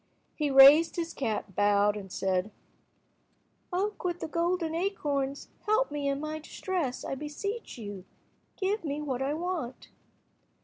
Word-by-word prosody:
He 300 -2 -1
raised 275 +4 +8
his 335 -1 -3
cap, 215 -6 -3
bowed, 205 0 +3
and 195 -3 -8
said— 190 +1 0 1.2
"Oak 400 +4 -1
with 350 -1 -1
the - - -4
golden 335 0 0
acorns, 290 -7 -2 0.2
help 435 +1 +2
me 290 -1 -2
in 275 0 0
my 305 +1 -4
distress, 315 - -3
I - - -3
beseech 300 - -5
you. 205 -4 -7 0.5
Give 405 +1 0
me 290 -2 -2
what 265 -3 -2
I 280 +2 0
want." 325 -7 -4
295 Hz, 140 wpm, -29 LUFS, 255-350 Hz, 1.2 s, raised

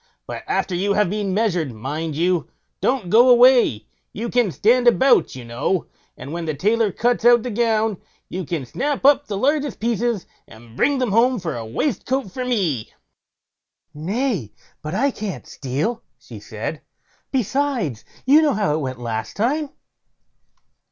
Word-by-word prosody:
But - - -6
after 185 - -1
you 195 +3 +1
have 210 -3 +1
been 205 -2 -2
measured, 180 - 0
mind 145 +7 -4
you 175 +2 0 0.3
don't 240 -9 0
go 240 +3 +6
away; 245 - +5 0.3
you 230 +3 -4
can 240 -6 +2
stand 240 +7 +3
about, 260 - +4
you 125 -2 -9
know, 120 +10 -1 0.3
and 140 +5 -8
when 170 0 -4
the 155 -2 -2
tailor 215 +6 +1
cuts 240 +4 0
out 240 -1 +6
the 250 - -4
gown, 220 -2 0 0.3
you 185 +1 -5
can 160 -4 -4
snap 275 - -2
up 285 0 +5
the 200 - -3
largest 285 +3 0
pieces, 230 -2 -1 0.2
and 115 +1 -15
bring 285 - +2
them 250 -5 0
home 245 +4 +3
for 165 -6 -4
a 115 - -5
waistcoat 260 - -2
for 255 - -4
me." 185 - -1 1.0
"Nay, 185 - -2 0.3
but 155 +4 -5
I 275 +7 +2
can't 210 -6 -6
steal", 150 - -3 0.2
she - - -12
said; - - -6 0.5
"besides, 255 - -1 0.2
you 290 +4 +6
know 300 -3 +2
how 205 -8 0
it 155 - 0
went 130 -2 -4
last 110 -2 -4
time." 280 +8 0
210 Hz, 160 wpm, -21 LUFS, 155-245 Hz, 1.0 s, go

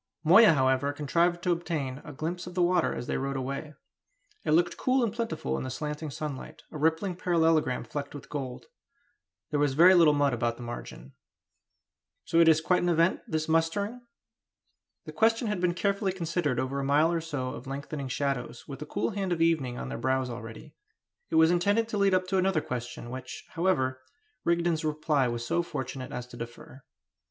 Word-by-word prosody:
Moya, 190 +5 +8
however, 130 0 +2
contrived 170 +4 +1
to 180 - +2
obtain 150 -6 -2
a - - -9
glimpse 165 +5 -4
of 180 - -9
the 180 - +1
water 175 -1 +2
as 120 - -4
they - - -2
rode 135 0 -2
away. 140 +3 -5 0.7
It - - -3
looked 175 +2 +3
cool 255 0 +1
and 220 -3 0
plentiful 225 - -2
in - - -4
the 130 - -4
slanting 150 +3 -4
sunlight 140 0 -6
a - - -6
rippling 160 +4 +1
parallelogram 165 -7 +2
flecked 145 0 -6
with 145 - -9
gold. 135 -4 -5 0.9
There 150 - +1
was 145 -2 +1
very 175 +5 +8
little 165 -5 +6
mud 145 -2 +2
about 120 0 -1
the 120 - -8
margin. 120 - -8 1.1
"So 165 - +2
it 165 - +6
is 160 -1 +5
quite 180 +2 +2
an 175 - +1
event, 170 +1 +3
this 155 0 -2
mustering?" 180 +9 0 1.0
The - - -7
question 225 +2 +2
had 210 -4 -2
been 175 -1 +1
carefully 200 +1 0
considered 170 -7 -1
over 135 +2 -2
a - - -2
mile 150 +4 +3
or 170 -1 0
so 145 -6 -3
of - - -8
lengthening 140 +1 -5
shadows, 125 -3 -3
with 140 -3 -7
the 150 - -7
cool 205 - -1
hand 195 -2 -2
of 170 - 0
evening 155 -7 +1
on 65 - -5
their 65 - -5
brows 130 -1 0
already. 115 -1 -9 0.6
It - - -2
was 160 +1 +6
intended 205 +6 +2
to 210 - -2
lead 195 -1 +4
up 185 0 +1
to 190 - +1
another 185 -4 +2
question, 120 -2 -6
which, 130 0 -7
however, 135 -8 0 0.4
Rigden's 170 -1 +1
reply 150 -3 +1
was 120 0 -3
so 170 +8 +1
fortunate 130 -5 -5
as 125 - -5
to 120 - -11
defer. 120 +3 -9
155 Hz, 195 wpm, -28 LUFS, 130-175 Hz, 1.1 s, Moya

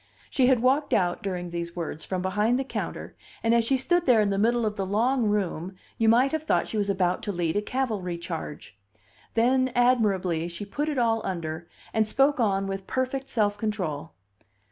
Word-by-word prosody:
She 255 -2 +3
had 250 -3 +3
walked 275 +4 +2
out, 175 -3 +1
during 180 -3 -4
these 170 0 -5
words, 165 -2 -5
from 185 -1 -3
behind 210 +6 +1
the 270 - -1
counter 270 - -5 0.3
and 225 0 +3
as 235 -1 +4
she 265 +4 +2
stood 345 +5 +1
there 245 -3 +6
in 205 -1 +2
the 195 - 0
middle 235 +2 +2
of 210 -1 -1
the 195 - -2
long 230 +6 +1
room 190 -3 -1 0.2
you 225 -1 +4
might 250 +4 +4
have 315 - -1
thought 315 - +1
she - - -6
was 205 -1 0
about 185 -2 +1
to 210 - -3
lead 170 -3 -1
a 205 - +2
cavalry 210 -8 -2
charge. 165 - -7 0.6
Then, 255 +3 +3
admirably, 200 -9 +2
she 175 +4 -6
put 290 +9 -2
it 295 - -2
all 225 -2 +2
under, 165 -3 -4 0.3
and 220 -1 +2
spoke 275 +5 +2
on 195 -4 +1
with 195 0 -5
perfect 260 +1 -2
self 205 -4 0
control. 180 - -3
210 Hz, 200 wpm, -26 LUFS, 180-250 Hz, 0.6 s, there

